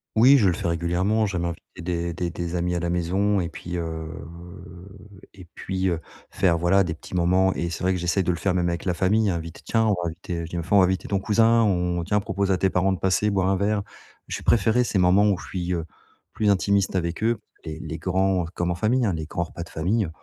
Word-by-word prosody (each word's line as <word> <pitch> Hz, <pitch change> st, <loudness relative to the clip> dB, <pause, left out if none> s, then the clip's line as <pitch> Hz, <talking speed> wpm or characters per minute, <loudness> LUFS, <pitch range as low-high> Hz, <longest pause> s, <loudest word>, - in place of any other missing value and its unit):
Oui 130 Hz, +5 st, +7 dB
je 105 Hz, -, +4 dB
le 90 Hz, -, +3 dB
fais 95 Hz, 0 st, -3 dB
régulièrement, 90 Hz, +6 st, +1 dB
j'aime 90 Hz, -3 st, -2 dB
inviter 85 Hz, +1 st, -7 dB
des 85 Hz, 0 st, -2 dB
des 85 Hz, +1 st, -2 dB
des 85 Hz, +1 st, -4 dB
amis 90 Hz, +1 st, -1 dB
à 85 Hz, -, 0 dB
la 85 Hz, 0 st, -2 dB
maison 95 Hz, +4 st, +1 dB
et 85 Hz, -2 st, -2 dB
puis, 90 Hz, 0 st, -6 dB
heu 80 Hz, -1 st, -4 dB, 1.3 s
et 95 Hz, -2 st, -12 dB
puis, 95 Hz, 0 st, -2 dB
heu, 85 Hz, -2 st, -1 dB, 0.3 s
faire 85 Hz, -3 st, +2 dB
voilà 90 Hz, +4 st, +3 dB
des 80 Hz, -3 st, -3 dB
petits -, -, -13 dB
moments 90 Hz, +2 st, +3 dB
et 85 Hz, -, -2 dB
c'est 85 Hz, -, -5 dB
vrai 95 Hz, +1 st, +2 dB
que 90 Hz, -, -2 dB
j'essaye 90 Hz, +2 st, +1 dB
de 90 Hz, -, +1 dB
le 85 Hz, -, -2 dB
faire 95 Hz, -1 st, 0 dB
même 90 Hz, -1 st, +1 dB
avec 85 Hz, 0 st, -4 dB
la 90 Hz, -2 st, 0 dB
famille, 100 Hz, +3 st, +2 dB
invite: 85 Hz, -2 st, -5 dB
«Tiens, 115 Hz, -1 st, +1 dB
on -, -, +2 dB
va 85 Hz, -, -2 dB
inviter, 85 Hz, +1 st, -5 dB
heu», 85 Hz, -, -4 dB
je 80 Hz, -, -10 dB
dis: -, -, -7 dB
«Bah 85 Hz, -, -2 dB
f -, -, -13 dB
on 100 Hz, -, +6 dB
va 95 Hz, -, +6 dB
inviter 95 Hz, 0 st, -1 dB
ton 100 Hz, -, 0 dB
cousin, 115 Hz, +3 st, +3 dB
on 90 Hz, -4 st, 0 dB
tiens, 105 Hz, +4 st, +1 dB
propose 100 Hz, -1 st, -1 dB
à 95 Hz, -, +2 dB
tes 95 Hz, -, +2 dB
parents 95 Hz, +2 st, +2 dB
de 95 Hz, -, -4 dB
passer 95 Hz, +3 st, +2 dB
boire 95 Hz, -2 st, +1 dB
un 95 Hz, -, +2 dB
verre». 100 Hz, +1 st, 0 dB, 0.4 s
Je -, -, -3 dB
vais -, -, -13 dB
préférer 115 Hz, +2 st, +3 dB
ces 110 Hz, -, -1 dB
moments 95 Hz, +3 st, +4 dB
où 95 Hz, -, +2 dB
je -, -, -10 dB
suis, 90 Hz, -1 st, -3 dB
heu, 85 Hz, -2 st, -2 dB, 0.5 s
plus 105 Hz, -2 st, +1 dB
intimiste 100 Hz, 0 st, +2 dB
avec 85 Hz, 0 st, -2 dB
eux, 115 Hz, +1 st, +1 dB, 0.2 s
les 80 Hz, -1 st, -6 dB
les 80 Hz, 0 st, -6 dB
grands 95 Hz, 0 st, +1 dB
comme 90 Hz, 0 st, -1 dB
en -, -, -1 dB
famille, 115 Hz, +6 st, +1 dB
hein, 100 Hz, -, +1 dB
les 80 Hz, -1 st, -4 dB
grands 85 Hz, -, -2 dB
repas 85 Hz, 0 st, -7 dB
de 85 Hz, -, -13 dB
famille, 95 Hz, +4 st, 0 dB
90 Hz, 260 wpm, -24 LUFS, 85-100 Hz, 1.3 s, Oui